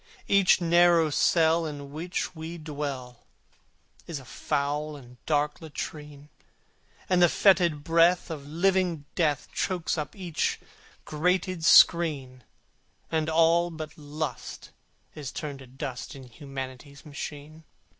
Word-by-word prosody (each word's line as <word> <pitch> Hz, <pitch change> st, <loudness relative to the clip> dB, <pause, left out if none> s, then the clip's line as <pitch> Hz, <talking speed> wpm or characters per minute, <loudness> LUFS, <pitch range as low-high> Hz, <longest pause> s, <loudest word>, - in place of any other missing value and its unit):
Each 195 Hz, -3 st, +4 dB
narrow 170 Hz, -2 st, +4 dB
cell 165 Hz, +1 st, +3 dB
in 145 Hz, -2 st, -8 dB
which 175 Hz, +4 st, -4 dB
we 160 Hz, +2 st, -7 dB
dwell 140 Hz, -6 st, -6 dB, 0.8 s
Is 165 Hz, -, -4 dB
a 135 Hz, -, -10 dB
foul 145 Hz, +4 st, -2 dB
and 125 Hz, -3 st, -15 dB
dark 150 Hz, 0 st, 0 dB
latrine, 150 Hz, -1 st, -8 dB, 0.8 s
And 180 Hz, -1 st, +2 dB
the 175 Hz, -, +7 dB
fetid 170 Hz, -7 st, +3 dB
breath 170 Hz, +3 st, +3 dB
of 145 Hz, -3 st, -7 dB
living 175 Hz, -1 st, +1 dB
Death 150 Hz, -6 st, 0 dB
Chokes 175 Hz, -3 st, -1 dB
up 150 Hz, -, -5 dB
each 180 Hz, -5 st, -2 dB, 0.5 s
grated 180 Hz, +2 st, 0 dB
screen, 145 Hz, -8 st, +5 dB, 0.7 s
And 160 Hz, -1 st, 0 dB
all, 165 Hz, +2 st, +3 dB
but 160 Hz, -2 st, -8 dB
Lust, 150 Hz, -2 st, -6 dB, 0.4 s
is 145 Hz, -4 st, -7 dB
turned 145 Hz, -3 st, -6 dB
to 135 Hz, -, -12 dB
dust 130 Hz, +2 st, -7 dB
In 135 Hz, -, -10 dB
Humanity's 135 Hz, +2 st, -9 dB
machine. 150 Hz, +1 st, -8 dB
155 Hz, 120 wpm, -27 LUFS, 145-170 Hz, 0.8 s, the